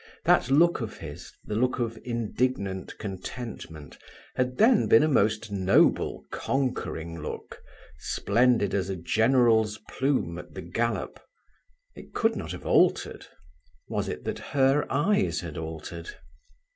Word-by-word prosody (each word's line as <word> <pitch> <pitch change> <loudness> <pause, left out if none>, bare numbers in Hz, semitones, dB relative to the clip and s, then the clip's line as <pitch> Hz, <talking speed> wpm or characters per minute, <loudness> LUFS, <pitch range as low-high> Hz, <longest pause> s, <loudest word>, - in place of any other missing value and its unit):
That - - +4
look 165 +3 +4
of 110 -2 -5
his, 75 -3 -9
the - - -5
look 125 +4 +1
of 115 -3 -2
"indignant 115 -4 -2
contentment", 95 - -7 0.3
had 125 0 -1
then 225 0 +5
been 115 - +6
a - - +3
most 110 -5 +1
noble 95 -1 +2
conquering 85 - -2
look, 75 - -7 0.4
splendid 115 - +2
as 95 -1 0
a 95 - -2
general's 110 +3 +3
plume 130 - -1
at - - -12
the 95 - -6
gallop. 115 +8 -2 0.7
It - - -14
could 225 -1 +2
not 80 -2 -5
have 90 - -8
altered. - - +2 0.6
Was - - -2
it - - -5
that - - -3 0.2
her 135 +2 +4
eyes 145 - +1
had 85 -4 -7
altered? 80 +1 -6
110 Hz, 135 wpm, -27 LUFS, 90-125 Hz, 0.7 s, been